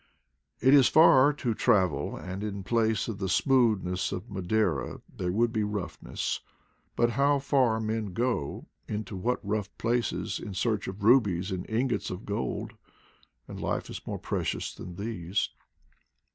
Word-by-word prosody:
It 130 +4 +5
is 140 -3 +7
far 145 -3 +7
to 130 -5 -2
travel, 95 -8 +1
and 95 +2 -6
in 100 -2 -4
place 110 +1 +1
of 110 -4 -5
the 95 -2 -2
smoothness 105 - +2
of 95 +5 -6
Madeira 100 +3 0 0.2
there 90 -1 -2
would 115 +4 +1
be 110 - +1
roughness; 100 -5 -3 0.6
but 120 0 +2
how 140 +3 +3
far 135 -5 +2
men 110 -1 -2
go, 115 - -2 0.2
into 105 -1 -4
what 120 +7 -1
rough 105 -1 -1
places, 120 +1 -1
in 100 - -7
search 105 +1 0
of 95 +2 -6
rubies 100 -6 +4
and 95 -1 -4
ingots 120 +4 0
of 90 +2 -6
gold; 100 -11 -3 0.7
and - - -8
life - - -2
is - - -6
more - - -3 0.6
than 90 - -8
these. 100 -2 -2
110 Hz, 145 wpm, -28 LUFS, 95-120 Hz, 0.7 s, is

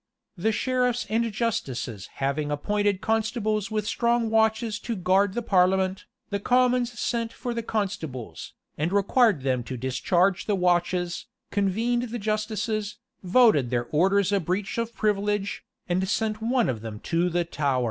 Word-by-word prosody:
[] - - -57
The 220 - +4
sheriffs 250 +1 0
and 230 +1 +1
justices 130 - -3
having 140 +2 -1
appointed 205 +6 0
constables 220 -2 0
with 215 -1 -2
strong 235 0 +1
watches 220 -1 +2
to 235 - -4
guard 190 +1 +2
the 240 - -1
parliament, 190 -1 +2 0.3
the 200 - 0
commons 245 +1 +2
sent 230 -1 -1
for 245 - -5
the 230 - -2
constables, 185 - -4 0.3
and 160 +4 0
required 200 - +3
them 130 -2 +1
to 130 - -5
discharge 175 +9 +1
the 210 - +2
watches, 175 +1 0 0.2
convened 225 +5 0
the 240 - -4
justices, 215 -1 -2 0.2
voted 185 - +4
their 120 -1 0
orders 195 +5 +3
a 200 - +3
breach 195 - -2
of 230 0 -3
privilege, 205 -1 0 0.2
and 185 +1 0
sent 215 0 -1
one 240 +1 +2
of 115 -4 -2
them 110 -2 -7
to 170 +2 0
the 175 0 0
Tower. 140 -5 0
205 Hz, 155 wpm, -26 LUFS, 175-225 Hz, 0.3 s, The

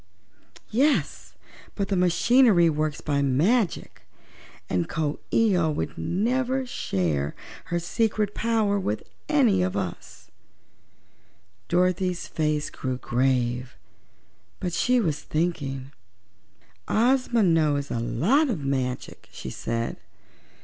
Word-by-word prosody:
"Yes; 275 +7 +1 0.4
but 200 -2 -2
the 200 - +1
machinery 180 0 +4
works 150 -1 -2
by 140 -2 0
magic, 170 - +1 0.7
and 90 -2 -1
Coo 150 -2 -2
ee 225 -4 +3
oh 170 -3 +2
would 150 - -3
never 255 +7 0
share 80 - -2 0.3
her 175 - -2
secret 210 +4 0
power 220 -3 +1
with 110 - -2 0.3
any 255 -11 +4
one 180 - +2
of 185 - -4
us." 90 - -6 1.4
Dorothy's 180 0 +1
face 150 -2 -1
grew 130 -1 -3
grave; 125 -1 0 0.8
but 180 -2 -3
she 250 +5 +2
was 160 -9 0
thinking. 140 -5 -2 1.0
"Ozma 245 0 +2
knows 155 -5 +2
a 115 - -1
lot 220 - +2
of 165 - -3
magic," 130 -2 -3
she - - -7
said. 115 0 -3
170 Hz, 110 wpm, -25 LUFS, 135-220 Hz, 1.4 s, machinery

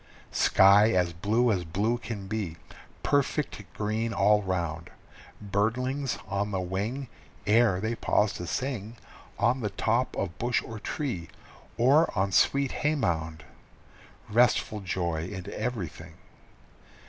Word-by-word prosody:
Sky 100 +3 +6
as 90 -2 +1
blue 110 +8 +2
as 95 -4 0
blue 105 +8 0
can 110 -5 -6
be, 95 -5 -3 0.5
perfect 145 -4 0
green 110 +2 -1
all 105 +3 +4
round, 85 -4 -3 0.5
Birdlings 120 +7 -1
on 100 +1 -1
the 95 -2 -2
wing 100 +9 -3 0.4
Ere 105 -3 +4
they 110 +3 -1
pause 105 -2 +1
to 90 - -6
sing 120 -3 -3 0.4
On 120 +4 +2
the 105 -4 -2
top 115 +5 0
of 90 -4 -3
bush 120 0 +1
or 115 -1 -7
tree, 110 - -3 0.5
or 140 +8 +4
on 95 +1 +1
sweet 140 +8 +3
hay 150 +1 +2
mound 80 - -2 0.8
Restful 110 -1 +2
joy 85 -4 -2
in 95 -1 -7
everything! 110 -7 -4
105 Hz, 125 wpm, -28 LUFS, 95-120 Hz, 0.8 s, Sky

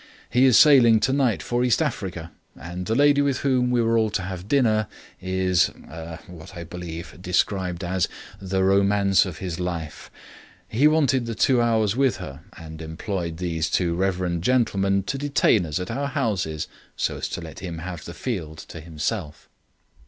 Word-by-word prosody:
He 125 +3 +4
is 130 -3 +6
sailing 120 -7 +7
tonight 130 -2 +1
for 120 0 0
East 125 -2 +3
Africa, 95 - -3 0.2
and 85 +6 -7
the 110 - 0
lady 145 +1 +4
with 140 -2 0
whom 130 -3 +2
we 120 -1 +2
were 115 0 +2
all 110 -1 +1
to 105 -3 -2
have 95 0 -6
dined 110 -5 +2 0.3
is 95 -2 +2 0.2
er 80 0 -7
what 90 -4 -12
is - - -11
I 85 - -5
believe 85 0 -8
described 90 -1 -1
as 90 +1 0 0.3
'the 95 0 -1
romance 100 0 +3
of 85 -4 -7
his 90 -1 -5
life'. 85 -3 -5 0.6
He 130 +7 +3
wanted 135 -6 +2
that 115 -2 -4
two 125 0 +3
hours 110 -3 +2
with 135 -1 +2
her, 70 -7 -8 0.2
and 80 0 -9
employed 85 +1 -4
these 80 -3 -2
two 85 -1 +1
reverend 90 -2 -1
gentlemen 100 -5 +2
to 135 +7 -3
detain 130 - +2
us 75 +2 -2
at 90 +4 -4
our 140 +4 -2
houses 105 - -2 0.3
so - - -1
as - - -4
to - - -4
let 80 -1 -9
him 85 -3 -6
have 85 -2 -6
the 85 - -8
field 85 -11 -4
to 80 - -8
himself." 80 +1 -4
95 Hz, 180 wpm, -24 LUFS, 85-120 Hz, 0.6 s, sailing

